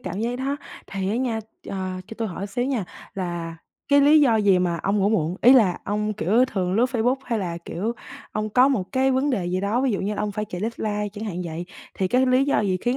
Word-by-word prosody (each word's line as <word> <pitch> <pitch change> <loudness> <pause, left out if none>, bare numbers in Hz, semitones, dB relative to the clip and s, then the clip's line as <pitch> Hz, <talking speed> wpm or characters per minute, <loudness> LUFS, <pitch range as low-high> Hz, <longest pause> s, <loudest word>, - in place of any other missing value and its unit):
cảm 205 -3 -5
giác 240 +2 -1
đó. 275 +2 -2 0.3
Thì 195 -1 -3
á 220 - 0
nha, 245 -3 -1 0.3
ờ, 185 -1 -4
cho 225 - -9
tôi 225 -2 -1
hỏi 190 +3 -5
xíu 245 +5 -2
nha 255 -7 -1 0.3
là 175 -3 -4 0.3
cái 285 0 +6
lý 300 +2 +6
do 245 -6 +4
gì 200 -3 +4
mà 175 -2 0
ông 200 +1 +1
ngủ 200 0 +3
muộn? 180 -5 0
Ý 250 - +8
là 210 -9 +4
ông, 210 +1 -1
kiểu, 220 +4 +3
thường 185 -7 -2
lướt 230 - +4
Facebook 245 +1 +1
hay 230 -2 -1
là, 170 -3 -3
kiểu, 215 +7 -3 0.4
ông 215 0 -2
có 250 +5 +5
một 210 -8 -1
cái 265 0 +3
vấn 265 +3 +1
đề 195 -9 -1
gì 185 +1 -1
đó, 210 +5 0
ví 265 -1 +1
dụ 195 - -1
như 205 +2 -2
là 210 - -2
ông 210 -1 -2
phải 210 +1 -2
chạy 180 -3 -7
deadline 210 -2 -2
chẳng 215 +1 -6
hạn 195 -5 -4
vậy, 165 +1 -5 0.3
thì 190 - -1
cái 255 +5 +3
lý 255 +1 +4
do 280 - +2
gì 190 -3 +1
khiến 245 +4 0
210 Hz, 260 wpm, -24 LUFS, 190-250 Hz, 0.4 s, Ý